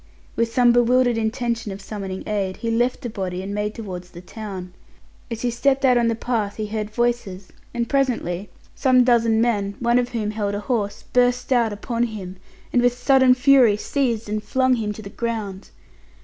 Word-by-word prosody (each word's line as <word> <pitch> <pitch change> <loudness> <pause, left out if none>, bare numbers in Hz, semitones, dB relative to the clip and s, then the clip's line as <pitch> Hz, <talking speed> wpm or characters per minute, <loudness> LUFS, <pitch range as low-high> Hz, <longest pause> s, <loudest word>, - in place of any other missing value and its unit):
With 230 0 0
some 245 0 +4
bewildered 245 0 +3
intention 230 -1 -2
of 195 - -7
summoning 195 -1 -6
aid, 200 -3 -2
he 230 -1 -2
left 240 +4 +1
the - - -2
body 185 -3 -4
and 200 +1 -5
made 210 +1 -2
towards 180 -5 -7
the 175 - -11
town. 185 -1 -8 0.6
As 230 -1 -5
he 245 - +1
stepped 270 +3 +1
out 250 -1 +5
on 240 -1 +3
the 230 - +1
path 220 -3 -2
he 215 - -3
heard 210 0 -3
voices, 220 -5 -2 0.2
and 235 -1 -2
presently 225 -9 -1 0.2
some 255 -2 +4
dozen 230 -2 +3
men, 205 -4 0
one 240 0 +3
of 245 0 -1
whom 220 -4 -2
held 205 -2 -2
a 205 - -3
horse, 210 -3 -2
burst 250 +1 +2
out 235 -3 +2
upon 230 +3 -2
him, 195 -5 -7 0.4
and, 245 - +4
with 245 0 +2
sudden 260 -1 +5
fury, 255 -5 +5
seized 235 -2 -1
and 210 +1 -2
flung 260 0 +2
him 215 -2 -2
to 215 +1 -8
the 200 - -8
ground. 215 -5 -4
230 Hz, 190 wpm, -22 LUFS, 205-245 Hz, 0.6 s, out